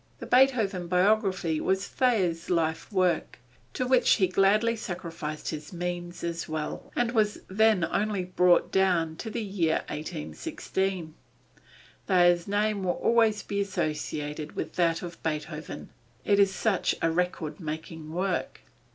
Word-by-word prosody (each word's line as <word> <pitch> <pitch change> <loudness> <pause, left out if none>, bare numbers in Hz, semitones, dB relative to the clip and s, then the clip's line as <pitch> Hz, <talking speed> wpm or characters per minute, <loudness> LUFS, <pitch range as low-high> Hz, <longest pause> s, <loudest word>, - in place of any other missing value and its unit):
The - - -8
Beethoven 225 -9 +3
biography 185 -3 +2
was 190 +1 0
Thayer's 185 -10 +1
life 165 +2 0
work, 185 -3 +1 0.4
to 255 - 0
which 255 0 +4
he 195 - +3
gladly 205 +5 +3
sacrificed 170 -7 -5
his 155 -1 -6
means 175 -1 -5
as 170 -1 -3
well, 155 -1 -4
and 240 -1 +1
was 215 -3 +1
then 215 -1 +3
only 205 -1 -1
brought 180 -1 +3
down 175 -4 +2
to 225 - -5
the 220 - -3
year 180 -6 0
1816. 155 - -4 0.9
Thayer's 175 -2 +4
name 205 0 0
will 180 -1 +1
always 225 -2 +2
be 200 0 -2
associated 150 -4 -3
with 160 - -4
that 165 -1 +1
of 175 -1 -8
Beethoven, 155 0 -5 0.4
it 200 -1 +3
is 200 -1 +5
such 195 0 0
a 165 - +1
record 175 -1 -2
making 155 -1 -6
work. 180 +2 -2
180 Hz, 135 wpm, -27 LUFS, 165-205 Hz, 0.9 s, is